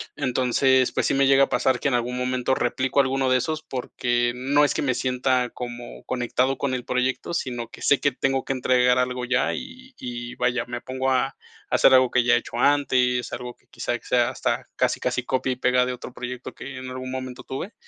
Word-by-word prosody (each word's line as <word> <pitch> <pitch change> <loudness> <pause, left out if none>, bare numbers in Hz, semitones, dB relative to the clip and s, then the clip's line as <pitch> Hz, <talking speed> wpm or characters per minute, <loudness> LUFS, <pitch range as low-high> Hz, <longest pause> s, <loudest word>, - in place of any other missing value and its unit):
Entonces, 130 +1 +2
pues, - - +1
sí - - +1
me 135 0 +3
llega 135 0 +6
a - - -17
pasar 125 0 +1
que, - - -1
en 135 - -2
algún 120 +1 -1
momento, 125 0 0
replico 130 +3 0
alguno 135 0 0
de 130 - +4
esos, 155 +5 -2
porque 120 -1 -1
no 140 +4 +2
es - - 0
que - - -2
me 130 -2 +1
sienta 125 -1 0
como 120 -1 -8
conectado 130 +1 0
con 135 -2 -1
el 125 -1 -3
proyecto, 125 +6 -1
sino 120 -7 -3
que - - -13
sé 145 - +3
que 145 - +2
tengo 135 0 0
que - - -1
entregar 125 -1 +3
algo 125 0 -1
ya 130 +2 +1
y 260 0 -9
y 120 0 -6
vaya, 125 -1 0
me 120 0 -6
pongo 130 +1 -2
a 130 +1 +1 0.3
hacer 130 - +5
algo 130 -1 +5
que 125 -1 +3
ya 120 - +4
he - - +4
hecho - - -6
antes, 125 -4 +2
algo 125 0 -6
que - - -36
quizá - - -3
sea - - +2
hasta - - -2
casi, - - +1
casi 125 - -1
copia 130 0 0
y - - -7
pega 125 0 +3
de 125 - -2
otro 125 0 -9
proyecto 125 0 -6
que 135 0 -8
en 130 0 -7
algún 130 0 -6
momento 130 -1 -6
tuve. 175 - -6
130 Hz, 220 wpm, -24 LUFS, 125-130 Hz, 0.3 s, llega